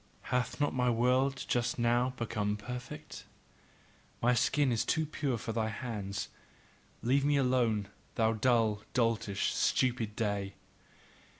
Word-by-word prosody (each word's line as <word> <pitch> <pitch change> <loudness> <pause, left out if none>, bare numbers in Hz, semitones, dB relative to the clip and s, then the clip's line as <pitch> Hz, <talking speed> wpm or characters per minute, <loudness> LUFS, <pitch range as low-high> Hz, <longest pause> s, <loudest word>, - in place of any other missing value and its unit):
Hath 125 +4 0
not 145 - +1
my 125 -1 +2
world 125 +3 +2
just 120 -1 0
now 120 +2 +2
become 105 -3 -1
perfect? 125 +4 -8 0.9
My 125 +1 +3
skin 130 +3 +2
is 115 - +1
too 160 -1 +1
pure 145 -4 -2
for 115 - -4
thy 110 -1 0
hands. 100 -4 -4 0.7
Leave 135 +4 +3
me 145 0 +3
alone, 120 -6 +2 0.3
thou 110 0 +3
dull, 110 -2 +2
doltish, 115 -5 +1
stupid 120 -4 +1
day! 100 -3 -2
120 Hz, 125 wpm, -32 LUFS, 110-125 Hz, 0.9 s, My